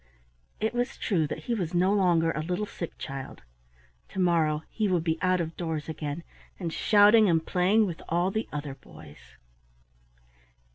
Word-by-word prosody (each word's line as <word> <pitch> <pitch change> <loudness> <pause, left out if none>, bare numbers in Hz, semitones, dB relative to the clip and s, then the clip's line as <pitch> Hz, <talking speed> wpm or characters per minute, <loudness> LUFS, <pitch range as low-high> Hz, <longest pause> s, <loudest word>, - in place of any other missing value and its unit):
It 220 +2 -1
was 245 +1 -2
true 165 -7 0
that - - -6
he 240 - -2
was 180 -6 -2
no 185 +3 +3
longer 175 -5 +3
a 150 - -3
little 180 +6 -2
sick 170 -4 -7
child. 135 -1 -7 0.7
To - - -6
morrow 160 -4 +2
he 215 -2 0
would 180 -4 +1
be 160 -1 -1
out 185 0 +2
of 165 -1 -3
doors 160 -3 -3
again, 155 0 -5 0.4
and 170 -4 -3
shouting 210 0 +5
and 165 -1 +2
playing 195 +4 +3
with 170 -4 -5
all 175 +3 +1
the 220 +3 -3
other 145 -1 -4
boys. 75 - -14
175 Hz, 170 wpm, -27 LUFS, 160-200 Hz, 0.7 s, shouting